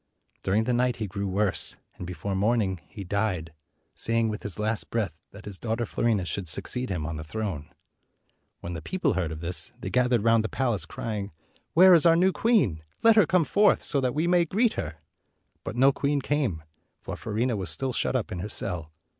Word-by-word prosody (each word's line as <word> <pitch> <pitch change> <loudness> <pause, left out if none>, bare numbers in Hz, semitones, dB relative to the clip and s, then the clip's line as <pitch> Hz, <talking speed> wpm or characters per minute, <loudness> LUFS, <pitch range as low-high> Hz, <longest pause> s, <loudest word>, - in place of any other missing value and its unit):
Dur 95 - 0
ing 110 - +3
the 125 +2 0
night 125 0 +2
he 110 - -3
grew 100 +1 -4
worse, 100 +1 -1 0.2
and 90 - -7
before 90 +3 -4
morn 110 +5 +2
ing 95 -5 -2
he 100 - -8
died, 90 -4 -2 0.4
saying 115 0 +1
with 105 -1 -4
his 100 - -5
last 110 0 -1
breath 105 -8 -1
that 100 +1 -13
his 100 -3 -6
daughter 115 +1 -1
Fiorina 110 -5 0
should 95 0 -3
succeed 125 +10 0
him 85 -6 -2
on 80 -1 -4
the 80 - -5
throne. 80 -3 -4 0.9
When 85 - -5
the 85 - -5
people 180 -7 0
heard 85 -4 -1
of 80 0 -6
this, 85 +1 0
they - - -5
gathered 125 -3 +2
round 115 -1 +4
the 110 - -3
palace, 115 -10 -1
crying, 105 -3 -5 0.4
"Where 185 +2 +8
is 170 0 +6
our 165 - +6
new 185 +3 +4
queen? 185 - +2 0.2
Let 225 -1 +7
her 210 -7 +6
come 180 -2 +3
forth, 205 +4 +3
so 140 - +1
that 125 0 -1
we 155 +3 +1
may 175 0 +4
greet 215 +7 +2
her!" 80 -4 -4 0.7
But 95 - -5
no 135 +3 +5
queen 140 +1 0
came, 130 - -1 0.4
for - - -5
Fiorina 115 +3 -1
was 95 -4 -2
still 130 +11 -2
shut 130 - -1
up 125 - -1
in 90 - -4
her 100 +4 -4
cell. 85 -6 -4
110 Hz, 215 wpm, -27 LUFS, 95-130 Hz, 0.9 s, Where